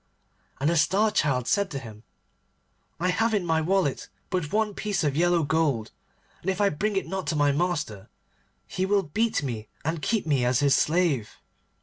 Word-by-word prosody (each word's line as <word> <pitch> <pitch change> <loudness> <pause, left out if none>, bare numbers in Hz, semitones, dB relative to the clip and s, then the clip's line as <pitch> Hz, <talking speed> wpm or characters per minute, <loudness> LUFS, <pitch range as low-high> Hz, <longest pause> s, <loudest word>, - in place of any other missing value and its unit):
And 140 - 0
the 170 - +1
Star 195 +8 +3
Child 135 - +1
said 200 -1 +1
to 140 - -5
him, 110 -5 -9 1.0
'I 180 +2 +1
have 225 +4 +1
in 195 -4 0
my 160 -1 +1
wallet 175 -4 0 0.2
but 180 -5 -1
one 215 0 +1
piece 205 -3 -2
of 145 -2 0
yellow 175 +1 +3
gold, 145 -7 0 0.5
and 185 - -2
if 190 0 -1
I 205 -1 +4
bring 200 +7 -2
it 195 - 0
not 190 -4 -4
to 155 - 0
my 145 -1 +3
master 145 - -2 0.6
he 185 - -3
will 200 +1 +2
beat 215 +4 0
me 115 -5 -4 0.2
and 160 0 -1
keep 220 +1 0
me 140 -5 +1
as 125 +1 +2
his 140 -1 +4
slave. 155 -6 +1
165 Hz, 190 wpm, -26 LUFS, 140-195 Hz, 1.0 s, I